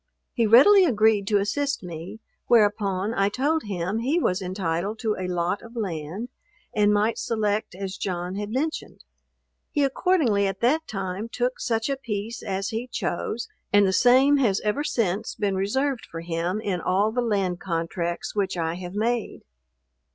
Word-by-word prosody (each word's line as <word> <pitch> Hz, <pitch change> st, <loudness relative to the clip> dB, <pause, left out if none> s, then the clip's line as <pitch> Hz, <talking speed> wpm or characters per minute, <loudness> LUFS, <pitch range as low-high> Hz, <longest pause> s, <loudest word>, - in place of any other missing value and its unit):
He 230 Hz, -3 st, +2 dB
readily 370 Hz, -, +8 dB
agreed 220 Hz, -, +3 dB
to 205 Hz, -, +3 dB
assist 250 Hz, +6 st, -1 dB
me; 175 Hz, +5 st, -8 dB, 0.3 s
whereupon 205 Hz, -2 st, +2 dB
I 195 Hz, -2 st, +2 dB
told 290 Hz, +7 st, 0 dB
him 190 Hz, +1 st, -2 dB
he 275 Hz, +9 st, +1 dB
was 185 Hz, -, 0 dB
entitled 185 Hz, +2 st, -2 dB
to 220 Hz, -3 st, 0 dB
a 185 Hz, -, -4 dB
lot 180 Hz, +2 st, -1 dB
of 230 Hz, +1 st, -13 dB
land, 190 Hz, +1 st, -4 dB, 0.4 s
and 210 Hz, -2 st, +3 dB
might 210 Hz, +2 st, +1 dB
select 210 Hz, -4 st, -1 dB
as 195 Hz, 0 st, -5 dB
John 180 Hz, -1 st, -3 dB
had 205 Hz, +1 st, -4 dB
mentioned. 290 Hz, +7 st, -3 dB, 0.7 s
He 290 Hz, -, +1 dB
accordingly 270 Hz, -, +2 dB
at 195 Hz, -1 st, -4 dB
that 310 Hz, +7 st, +2 dB
time 195 Hz, +2 st, -4 dB
took 245 Hz, +2 st, -2 dB
such 225 Hz, -2 st, 0 dB
a 275 Hz, -1 st, -1 dB
piece 225 Hz, -2 st, -4 dB
as 195 Hz, -1 st, -3 dB
he 225 Hz, +3 st, -3 dB
chose, 215 Hz, +1 st, -3 dB, 0.2 s
and 205 Hz, 0 st, +5 dB
the 190 Hz, -, +1 dB
same 260 Hz, +6 st, +5 dB
has 220 Hz, -8 st, +2 dB
ever 215 Hz, +7 st, 0 dB
since 220 Hz, -6 st, -1 dB
been 205 Hz, -2 st, 0 dB
reserved 255 Hz, +7 st, -1 dB
for 165 Hz, -, -6 dB
him 170 Hz, +4 st, -2 dB
in 195 Hz, -5 st, -2 dB
all 195 Hz, +5 st, +1 dB
the 245 Hz, +2 st, 0 dB
land 195 Hz, -6 st, 0 dB
contracts 170 Hz, 0 st, -3 dB
which 195 Hz, -3 st, -1 dB
I 165 Hz, 0 st, -1 dB
have 180 Hz, +1 st, -7 dB
made. 230 Hz, +2 st, -1 dB
205 Hz, 165 wpm, -25 LUFS, 185-235 Hz, 0.7 s, readily